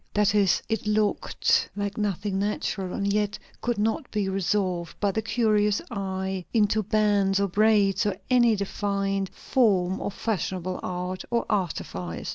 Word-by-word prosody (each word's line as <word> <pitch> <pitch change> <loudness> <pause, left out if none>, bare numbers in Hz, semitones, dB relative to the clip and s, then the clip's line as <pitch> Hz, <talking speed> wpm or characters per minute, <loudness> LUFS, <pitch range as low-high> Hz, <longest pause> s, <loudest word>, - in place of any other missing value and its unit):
That 205 -1 +3
is, 200 -4 +3
it 225 -1 -2
looked 210 -1 +1
like 205 0 -3
nothing 200 -1 -1
natural, 200 -2 -2
and 200 0 0
yet 210 0 0 0.2
could 240 -2 -1
not 225 +8 -1
be 205 -2 -1
resolved 185 -2 -1
by 200 -1 +1
the 220 - -1
curious 210 -2 +2
eye 190 -2 -3
into 215 0 +3
bands 205 -2 +2
or 200 - +2
braids 205 0 +3
or 195 -2 -1
any 240 -3 +4
defined 195 -1 -1
form 190 -8 +1
of 200 - -4
fashionable 185 -4 -2
art 180 +1 -4
or 235 -1 0
artifice. 90 - -3
200 Hz, 145 wpm, -26 LUFS, 190-210 Hz, 0.2 s, any